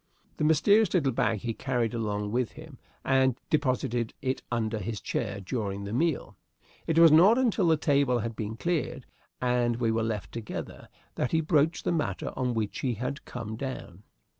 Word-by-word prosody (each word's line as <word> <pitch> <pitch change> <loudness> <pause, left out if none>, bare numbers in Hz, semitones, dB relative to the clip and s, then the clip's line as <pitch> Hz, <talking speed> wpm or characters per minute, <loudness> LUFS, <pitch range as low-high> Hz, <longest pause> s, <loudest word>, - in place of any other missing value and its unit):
The - - -1
mysterious 195 +7 +4
little 140 -7 +2
bag 110 -3 0
he 115 -1 -2
carried 125 -2 -1
along 105 -3 -2
with 120 0 -1
him, 155 -4 -12 0.3
and 130 -2 +3 0.2
deposited 125 -5 0
it 130 0 -2
under 110 -2 -1
his 105 +1 -4
chair 100 -3 -3
during 100 -1 -3
the 100 +1 -5
meal. 160 +5 0 0.5
It 165 - 0
was 165 -1 +8
not 185 +9 +7
until 230 -8 +2
the 160 -1 +4
table 140 -4 +2
had 115 0 -3
been 110 +1 -4
cleared 155 -4 -2 0.3
and 125 -1 +1
we 115 -1 0
were 115 0 0
left 110 -2 -3
together 115 -2 -7 0.2
that 125 - -2
he 160 - +4
broached 160 0 +1
the - - +1
matter 150 - -2
on 125 -2 -1
which 110 -2 -2
he 125 -3 -1
had 130 +6 -4
come 115 -3 -6
down. 110 -8 -6
125 Hz, 180 wpm, -28 LUFS, 110-150 Hz, 0.5 s, was